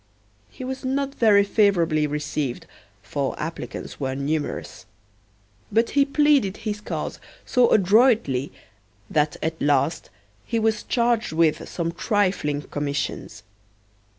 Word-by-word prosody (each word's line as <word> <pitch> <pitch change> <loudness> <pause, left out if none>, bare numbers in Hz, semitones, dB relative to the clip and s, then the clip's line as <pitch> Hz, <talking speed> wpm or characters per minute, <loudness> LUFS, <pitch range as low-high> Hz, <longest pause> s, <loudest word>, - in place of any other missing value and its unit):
He - - -10
was 265 +1 -5
not 275 +1 -1
very 210 -6 +5
favorably 175 -7 +2
received, 150 -3 -3 0.4
for 140 -2 -3
applicants 160 +2 -6
were 130 -2 -2
numerous. 145 +2 -3 0.8
But 225 +2 +2
he 280 -1 +4
pleaded 280 -8 +2
his 210 -1 -3
cause - - -4 0.3
so 250 -2 +3
adroitly 205 - +3 0.6
that 150 -1 +1
at 160 0 -3
last 145 +3 +1 0.3
he 230 - -2
was 220 -1 +1
charged 235 -5 0
with 160 -1 +1
some 170 -1 -2
trifling 180 -6 0
commissions. 140 -7 -4
185 Hz, 115 wpm, -23 LUFS, 150-230 Hz, 0.8 s, very